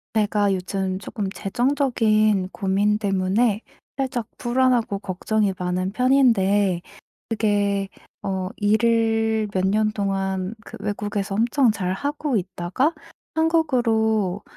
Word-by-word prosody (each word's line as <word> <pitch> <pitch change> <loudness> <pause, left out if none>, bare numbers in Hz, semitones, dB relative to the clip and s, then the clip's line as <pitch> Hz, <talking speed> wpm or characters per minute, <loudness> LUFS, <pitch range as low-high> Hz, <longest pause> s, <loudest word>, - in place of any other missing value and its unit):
제가 205 -2 +2
요즘 185 0 -2
조금 200 0 -4
재정적인 215 -4 +1
고민 205 +2 +1
때문에 200 +2 +1 0.4
살짝 255 -4 -2
불안하고 245 -4 +1
걱정이 200 +1 -1
많은 180 +1 -2
편인데 205 -7 +3 0.5
그게 205 -3 0 0.3
어 190 -1 -2
일을 225 0 +2
몇 185 0 +1
년 215 +2 +2
동안 195 -1 -2
그 - - -9
외국에서 205 -1 -3
엄청 240 +2 +3
잘 185 -3 -2
하고 285 +2 -1
있다가 185 - -1 0.4
한국으로 225 - +1
210 Hz, 225 characters per minute, -23 LUFS, 195-230 Hz, 0.5 s, 편인데